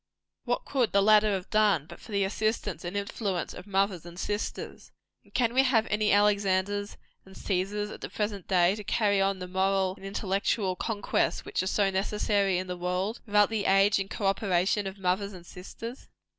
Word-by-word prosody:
What 245 -1 -1
could 255 -5 0
the 200 - +5
latter 215 0 +5
have 185 -2 -4
done, 210 -8 +3
but - - -12
for 220 - -13
the 200 -1 +1
assistance 205 -3 -2
and 180 +3 -4
influence 200 -3 -3
of 180 - -10
mothers 195 -3 0
and 175 +1 -10
sisters? 205 +3 -4 0.3
And - - -24
can 235 -2 +1
we 260 - +5
have 245 -4 +3
any 210 0 +2
Alexanders 205 0 +1 0.3
and 190 0 -16
Cæsars, 205 +2 -2
at - - -11
the - - -5
present 205 -3 -3
day, 180 -1 +4
to 210 - -7
carry 200 -1 +1
on 195 0 +1
the 180 0 -6
moral 190 0 +1
and - - -15
intellectual 195 0 -1
conquests 205 +1 -1
which - - -1
are 185 - -3
so 195 0 +2
necessary 200 0 +1
in 185 - -2
the 180 -1 -4
world, 180 +5 -2
without 210 0 +4
the 215 -2 -1
aid 195 +1 +4
and 195 0 -3
co 205 - -4
operation 195 0 +1
of 190 +1 -7
mothers 195 +2 -1
and 175 -2 -11
sisters? 230 +8 -9
200 Hz, 195 wpm, -28 LUFS, 190-210 Hz, 0.3 s, the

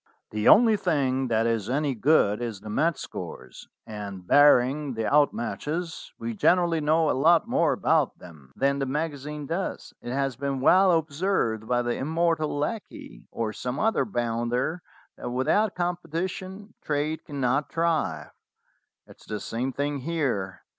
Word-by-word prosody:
"The 105 0 -1
only 220 -1 +7
thing 135 -8 0
that 115 -1 +1
is 115 -2 -1
any 140 +1 0
good 120 -4 +2
is 115 -5 -5
the 105 0 -7
match 160 +8 +1
scores; 65 0 -8 0.2
and, 100 -4 -7
barring 145 +1 +4
the 110 0 -2
out 145 +3 +4
matches, 155 - -4
we 115 0 -4
generally 170 - +2
know 155 +1 +2
a - - +1
lot 165 - +4
more 170 -9 +2
about 155 -3 +1
them 75 -7 -15
than 140 +1 +1
the 135 - -1
magazine 150 0 -4
does. 170 +6 -4
It 120 - -6
has 135 -1 -1
been 140 0 -3
well 185 +7 +5
observed 155 - 0
by 120 0 +1
the 120 0 -1
immortal 160 0 0
Lecky, 150 - -5
or 110 -2 -3
some 125 +2 -4
other 225 +1 +2
bounder, 120 - -2 0.4
that - - -5
without 130 - +1
competition 180 +3 -4
trade 150 +1 -2
cannot 140 -1 -1
thrive. 160 - -1 0.7
It - - -16
is - - -17
the 105 -1 -4
same 125 +6 -3
thing 145 +2 -2
here. 130 - -2
140 Hz, 155 wpm, -26 LUFS, 120-165 Hz, 0.7 s, only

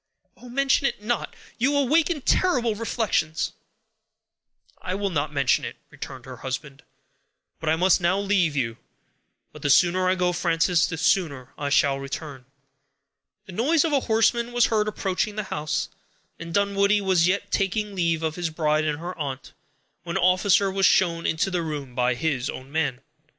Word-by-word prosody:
"Oh! 250 - -14
mention 275 +2 +2
it 210 - -5
not! 240 +2 -2 0.2
You 280 +4 +2
awaken 300 +3 +2
terrible 250 -9 +2
reflections." 210 -8 -1 1.3
"I 185 - -3
will 200 0 -2
not 150 -2 -1
mention 140 -3 +2
it," - - -5 0.2
returned 130 -2 -9
her 130 -1 -9
husband; 135 +3 -6 0.8
"but 160 - -2
I 160 - +3
must 180 +2 +3
now 175 +2 +2
leave 195 -6 +1
you. 115 -4 -1 0.8
But - - -12
the 145 - -1
sooner 185 +5 +4
I 185 - +2
go, 180 -1 +1
Frances, 170 0 +2
the 160 - -5
sooner 160 -7 0
I 145 -1 -3
shall 140 -1 +3
return." 135 -1 -7 1.0
The - - -10
noise 285 - +2
of 315 - -1
a 280 - +4
horseman 235 +2 +2
was 240 -1 +4
heard 215 -1 +1
approaching 205 0 -2
the 215 - -2
house, 150 +1 -2 0.5
and 170 0 -7
Dunwoodie 200 +2 +2
was 185 -3 +3
yet 195 +3 -1
taking 205 +2 -1
leave 170 -3 0
of 160 +1 -2
his 175 -2 -1
bride 155 -1 0
and 150 -1 -1
her 175 +3 -6
aunt, 135 -3 -5 0.5
when 170 +2 -3
an 190 - 0
officer 190 +2 +3
was 195 0 +3
shown 170 -2 +2
into 160 +4 0
the 180 -1 0
room 145 -5 -5
by 125 0 +1
his 135 -2 -1
own 130 +1 -8
man. 140 -5 -1
175 Hz, 170 wpm, -24 LUFS, 150-205 Hz, 1.3 s, sooner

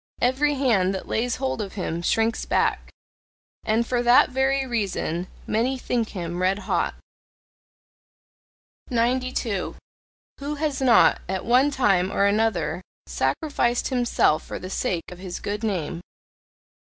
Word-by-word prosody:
Every 280 +4 +2
hand 205 -9 +2
that 190 - -6
lays 240 +2 0
hold 260 -4 -2
of 200 -2 -6
him 170 -4 -3
shrinks 225 +6 +1
back! - - 0 0.7
And 225 +2 +1
for 245 0 0
that 245 +1 +5
very 265 +1 +1
reason 195 -7 -2 0.2
many 245 +5 0
think 240 -3 -1
him 175 -2 -4
red 190 +2 +2
hot. - - 0 1.9
92. 245 -4 -1 0.6
Who 285 +2 -3
has 295 -2 -2
not, 250 -3 +5
at 190 -1 -2
one 255 +4 +4
time 195 -9 +2
or 200 - +2
another 200 -5 +1 0.2
sacrificed 265 -6 0
himself 245 - +2
for - - -6
the 185 - -8
sake 175 -3 -2
of 180 - -10
his 185 -1 -6
good 205 +2 -4
name? 175 -5 -2
225 Hz, 130 wpm, -24 LUFS, 190-255 Hz, 1.9 s, that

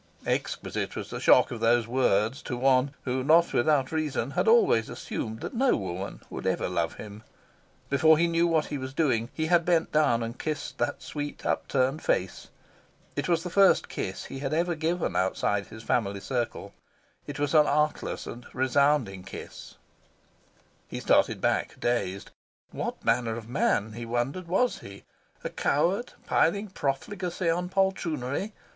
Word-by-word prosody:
Exquisite - - -2
was - - -6
the - - -4
shock - - +5
of 120 - -5
these 115 0 +3
words 120 0 +1
to 125 - -4
one 135 +2 +2
who, 130 0 -1
not 165 +4 +4
without 135 +1 +2
reason, 150 -5 -1
had 140 - 0
always 220 - +4
assumed 110 +1 -5
that - - -5
no 255 +2 +3
woman 95 0 -5
would - - -5
ever - - 0
love - - -1
him. 105 0 -9 0.7
Before 155 +3 +5
he 170 - +3
knew 170 0 +2
what 160 -2 +2
he 145 - -4
was 130 +1 -6
doing, 125 -8 +1
he 160 - -2
had 170 +1 +4
bent 165 -1 +1
down 145 -7 +3
and 115 +2 -6
kissed 155 -2 -4
the 120 - 0
sweet 145 -1 -6
upturned 135 +3 0
face. 95 0 -1 0.7
It - - -2
was 165 -1 +2
the 180 - -5
first 195 0 +4
kiss 95 0 -4
he 135 - -7
had 140 +2 -2
ever 175 +2 +1
given 165 +2 -1
outside 100 +2 0
his 110 0 -11
family 100 -4 0
circle. 120 +2 -3 0.5
It 145 -1 -6
was 145 0 -1
an 150 -2 +6
artless 150 +1 0
and 120 0 -8
a - - -12
resounding 130 -6 +2
kiss. - - -10 1.1
He - - -5
started - - +3
back, - - 0
dazed. 100 -5 -1 0.4
What - - -5
manner 115 -2 +1
of 115 -1 -8
man, 110 -4 +1
he 115 +1 -6
wondered, 125 +10 -2
was 215 +8 +1
he? 100 0 -11 0.4
A - - -2
coward, 185 - 0
piling 200 +6 +2
profligacy 175 +3 -2
on 180 +2 -2
poltroonery? 190 - -1
140 Hz, 165 wpm, -27 LUFS, 120-165 Hz, 1.1 s, an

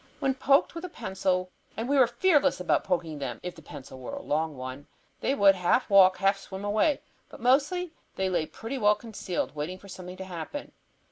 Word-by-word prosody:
When 270 -2 +1
poked 275 +2 +3
with 335 +1 -7
a 365 - -5
pencil, 190 - -1 0.3
and 225 +2 -2
we 285 - +2
were 260 -3 +6
fearless 295 - +3
about 180 - +1
poking 165 -4 -2
them, 125 -4 -4
if 180 0 -4
the 165 - -14
pencil 130 -3 -10
were 125 - -6
a - - -6
long 155 -1 -1
one, 130 +2 -7 0.3
they 275 - 0
would 200 -5 +6
half 190 +5 +1
walk, 190 -1 +7
half 195 +1 +2
swim 195 0 -7
away. 220 +9 +2 0.3
But - - -12
mostly 300 +8 +2 0.2
they 190 - 0
lay 170 -4 0
pretty 260 +4 -6
well 210 -1 +5
concealed, 210 -5 -4
waiting 155 +5 -4
for 200 - -15
something 180 0 -8
to 190 - -6
happen. 180 - -6
190 Hz, 205 wpm, -28 LUFS, 175-260 Hz, 0.3 s, walk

